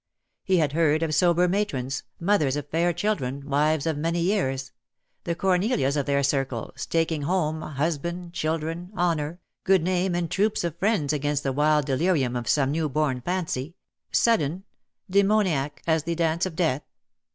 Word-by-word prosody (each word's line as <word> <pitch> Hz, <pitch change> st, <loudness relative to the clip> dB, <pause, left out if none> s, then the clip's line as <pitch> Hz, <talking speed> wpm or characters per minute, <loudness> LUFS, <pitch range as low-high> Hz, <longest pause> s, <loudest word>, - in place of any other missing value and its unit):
He 190 Hz, -1 st, +2 dB
had 155 Hz, -4 st, +2 dB
heard 155 Hz, 0 st, +2 dB
of 155 Hz, -1 st, -1 dB
sober 175 Hz, +1 st, +4 dB
matrons 145 Hz, -10 st, -1 dB
— -, -, -45 dB
mothers 170 Hz, -7 st, +2 dB
of 145 Hz, 0 st, -4 dB
fair 170 Hz, +3 st, +2 dB
children, 145 Hz, -7 st, -2 dB
wives 150 Hz, +1 st, +1 dB
of 160 Hz, -3 st, -1 dB
many 165 Hz, +2 st, 0 dB
years 135 Hz, -8 st, 0 dB, 0.3 s
— -, -, -50 dB
the 170 Hz, -, -1 dB
Cornelias 185 Hz, -, +1 dB
of 145 Hz, -1 st, -1 dB
their 140 Hz, 0 st, +2 dB
circle, 135 Hz, -4 st, -1 dB
staking 165 Hz, -2 st, -1 dB
home, 160 Hz, 0 st, 0 dB
husband, 170 Hz, +4 st, -3 dB
children, 165 Hz, +2 st, -2 dB
honour, 170 Hz, -1 st, 0 dB, 0.2 s
good 190 Hz, -3 st, +3 dB
name, 180 Hz, 0 st, 0 dB
and 175 Hz, -2 st, -2 dB
troops 205 Hz, 0 st, +1 dB
of 170 Hz, -3 st, -2 dB
friends 190 Hz, -8 st, +1 dB
against 145 Hz, 0 st, -1 dB
the 135 Hz, -, -1 dB
wild 150 Hz, +1 st, +3 dB
delirium 140 Hz, -2 st, +1 dB
of 120 Hz, -1 st, -3 dB
some 140 Hz, -2 st, +2 dB
new 155 Hz, 0 st, 0 dB
born 135 Hz, -3 st, 0 dB
fancy, 170 Hz, -2 st, -3 dB, 0.4 s
sudden, 185 Hz, -6 st, +2 dB, 0.4 s
demoniac 190 Hz, -7 st, +1 dB
as 160 Hz, -1 st, +2 dB
the 170 Hz, +2 st, -3 dB
dance 170 Hz, +1 st, +1 dB
of 170 Hz, -, -8 dB
death. 155 Hz, -6 st, +1 dB
160 Hz, 165 wpm, -25 LUFS, 145-175 Hz, 0.4 s, sober